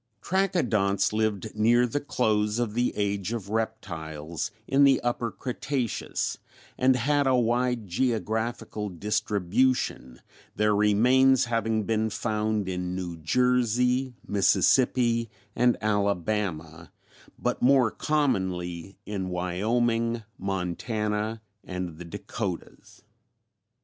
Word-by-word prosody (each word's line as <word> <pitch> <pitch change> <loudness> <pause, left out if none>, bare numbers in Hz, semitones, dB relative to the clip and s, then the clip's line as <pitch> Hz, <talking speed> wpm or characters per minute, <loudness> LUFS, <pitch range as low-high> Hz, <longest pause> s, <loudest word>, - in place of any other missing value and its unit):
"Trachodonts 120 - +1
lived 110 -1 -1
near 120 +3 +4
the 125 +4 -1
close 105 -6 0
of 120 -3 -1
the 120 +2 +1
Age 100 +1 -1
of 105 -4 -5
Reptiles 85 -8 -4 0.2
in 140 +1 +4
the 135 -2 +5
Upper 120 -1 -1
Cretaceous 125 +2 -3 0.4
and 130 0 +3
had 140 +3 +1
a 130 - +4
wide 120 -1 +1
geographical 110 0 -2
distribution, 100 - 0 0.4
their 105 0 +2
remains 125 +6 +4
having 115 -2 0
been 110 +1 0
found 110 -2 -1
in 90 -1 -3
New 90 -2 -4
Jersey, 125 - +1
Mississippi 115 +3 +3 0.3
and 125 0 +3
Alabama, 100 -6 -1 0.5
but - - -2
more 130 -3 +4
commonly 95 - -1
in 95 -3 -3
Wyoming, 115 +6 0 0.2
Montana, 105 +4 -2 0.2
and 90 -3 -5
the 90 - -7
Dakotas. 85 - -6
110 Hz, 100 wpm, -27 LUFS, 95-125 Hz, 0.5 s, the